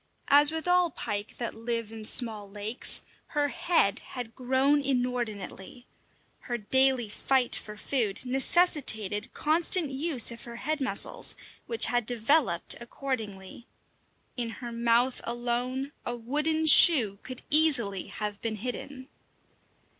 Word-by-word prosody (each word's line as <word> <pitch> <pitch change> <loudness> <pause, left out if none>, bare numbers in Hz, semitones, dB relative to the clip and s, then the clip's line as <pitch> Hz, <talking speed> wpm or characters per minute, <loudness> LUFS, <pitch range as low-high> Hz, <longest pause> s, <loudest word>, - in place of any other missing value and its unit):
As 290 +1 +7
with 320 +1 -4
all 360 -1 +3
pike 205 -7 -6
that 235 - -4
live 230 -1 -4
in 220 -1 -9
small 215 -4 +2
lakes, 210 +4 -2 0.3
her 290 0 +1
head 250 - +1
had 245 -3 -9
grown 265 +3 +1
inordinately. 245 -4 -4 0.5
Her 240 - -5
daily 260 +2 +2
fight 250 +4 +1
for 210 0 -7
food 220 -4 -2
necessitated 250 - +1
constant 320 0 +2
use 270 -3 +1
of 235 - -9
her 235 -1 -9
head 300 +5 -3
muscles, 265 - 0 0.3
which 460 - +4
had 240 -1 -1
developed 245 - +2
accordingly. 230 -4 -6 0.7
In 240 -2 -3
her 240 +1 -8
mouth 235 +2 +1
alone 245 +3 -3
a 240 - -4
wooden 300 +7 -1
shoe 250 - +7
could 255 -1 -10
easily 260 - +3
have 210 -1 -6
been 225 -1 -3
hidden. 255 +4 -7
245 Hz, 125 wpm, -27 LUFS, 225-280 Hz, 0.7 s, As